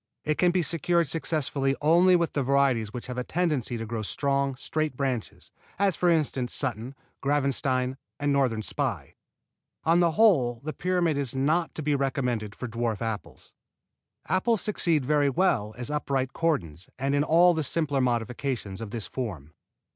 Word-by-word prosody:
It 155 0 -1
can 180 - +4
be 175 0 +1
secured 170 +1 +1
successfully 140 -3 -1
only 175 +4 +5
with 170 -2 0
the 145 - 0
varieties 135 -5 +2
which 120 +1 -6
have 125 0 -5
a - - -2
tendency 150 -8 -1
to 115 - -5
grow 115 0 -4
strong, 140 +4 -1
straight 155 0 -2
branches, 130 - -3 0.3
as 195 -3 +2
for 180 - +2
instance 140 -6 +1
Sutton, 125 0 -2 0.3
Gravenstein 135 -2 +1 0.2
and 145 -1 +1
Northern 125 -6 +1
Spy. - - -3 0.7
On 165 +2 +4
the 170 -2 +3
whole 145 - +4
the 155 +1 -4
pyramid 170 -2 0
is 135 -3 -2
not 155 +6 +1
to 155 - -4
be 150 0 +1
recommended 125 -6 -1
for 125 - -5
dwarf 115 -1 -2
apples. 110 -3 -6 0.7
Apples 215 +2 +1
succeed 170 - +1
very 145 0 +3
well 125 - +1
as 125 +3 -5
upright 135 -3 -1
cordons 95 - -2
and 135 +1 -1
in 145 0 +3
all 175 +3 +5
the 160 - -1
simpler 145 -1 0
modifications 120 -3 -2
of 110 - -5
this 115 -1 -4
form. 90 - -6
140 Hz, 165 wpm, -27 LUFS, 125-160 Hz, 0.7 s, only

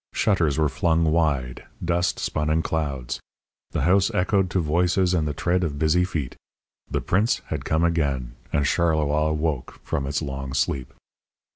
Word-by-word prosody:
Shutters 85 -9 +2
were 80 -1 +3
flung 80 +4 +1
wide; 70 -7 0 0.2
dust 85 +1 +1
spun 75 0 -1
in 80 +1 +2
clouds; 70 -7 -2 0.5
the - - -2
house 95 +4 +4
echoed 95 0 +2
to 95 - 0
voices 90 +3 +2
and 80 -4 +1
the 75 - -1
tread 90 +1 +1
of 75 -4 -2
busy 80 +4 +3
feet. 75 -8 -4 0.5
The - - -1
prince 105 +6 +1
had - - -3
come 80 +1 +1
again, 70 -8 0 0.2
and 75 - +1
Charleroi 75 -1 +2
woke 75 -4 -2
from 70 -1 -2
its 70 +3 -1
long 70 -1 -5
sleep. 65 0 -1
80 Hz, 160 wpm, -24 LUFS, 70-85 Hz, 0.5 s, house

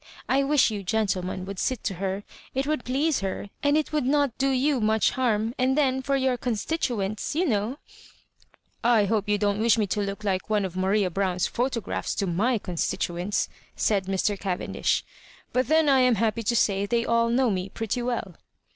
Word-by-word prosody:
I 270 +1 +3
wish 275 -4 +3
you 205 -2 -3
gentlemen 185 -3 -1
would 195 -1 -6
sit 255 -4 -1
to 200 - -1
her; 195 +1 -2 0.3
it 270 +1 0
would 305 -3 -1
please 280 +4 +1
her, 195 +1 -4
and 290 +1 +3
it 310 0 -1
would 300 -2 +1
not 285 -3 +2
do 275 0 +2
you 265 0 +1
much 220 0 +3
harm; 230 -3 0
and 260 +2 +2
then 265 -3 +2
for 275 +1 0
your 260 -2 +1
constituents, 230 -3 -2
you 350 +4 +2
know 225 - 0 0.3
" - - -33
" - - -43 0.2
I 205 - +3
hope 210 0 0
you 210 - +3
don't 205 0 0
wish 230 +1 +4
me 215 - +2
to 205 +2 -1
look 200 +1 -4
like 190 -1 -1
one 210 -2 +1
of 180 -2 -6
Maria 190 0 +1
Brown*a 185 0 -1
photographs 245 -2 -2
to 200 - 0
my 210 +8 +1
constituents," 180 0 -2 0.3
said 200 -3 +1
Mr. 195 +1 0
Cavendish; 185 -3 -1 0.2
" - - -25
but 255 +1 +1
then 315 0 +4
I 270 -2 +5
am 250 -2 +4
happy 225 +2 0
to 235 +2 0
say 200 -2 +2
they 235 +2 +1
all 230 0 +2
know 245 0 +2
me 185 0 -2
pretty 225 +4 -3
well." 240 -6 -3
220 Hz, 200 wpm, -26 LUFS, 200-260 Hz, 0.3 s, I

